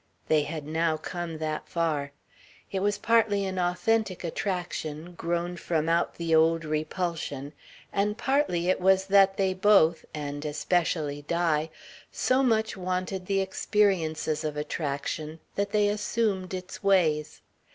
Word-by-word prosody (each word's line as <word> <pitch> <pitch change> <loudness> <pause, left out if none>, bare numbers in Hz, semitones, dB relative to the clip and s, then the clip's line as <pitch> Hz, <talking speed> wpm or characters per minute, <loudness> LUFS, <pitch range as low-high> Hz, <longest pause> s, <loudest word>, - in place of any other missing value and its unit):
They 155 -1 +4
had 150 0 -5
now 160 +1 0
come 170 0 -5
that 155 -1 -4
far. 155 -4 -1 0.6
It 195 - -1
was 205 +1 +1
partly 215 -4 +2
an 190 -1 -3
authentic 185 +2 0
attraction, 175 -2 -3
grown 175 +1 -2
from 160 -2 -1
out 170 +1 +1
the 165 -1 -1
old 165 +1 +4
repulsion, 155 -2 -3 0.4
and 210 +2 0
partly 265 - +1
it 185 - +2
was 190 +1 +4
that 195 0 +5
they 190 -1 +2
both 185 -4 +4
and 145 -1 -5
especially 150 -1 0
Di 160 0 0 0.4
so 255 +1 +2
much 220 -4 +1
wanted 185 0 -3
the 195 -1 +2
experiences 190 -6 0
of 150 -1 -3
attraction 150 +1 -3
that 200 0 -1
they 210 0 +3
assumed 205 -3 -1
its 185 0 -7
ways. 160 -6 +2
175 Hz, 135 wpm, -27 LUFS, 155-195 Hz, 0.6 s, that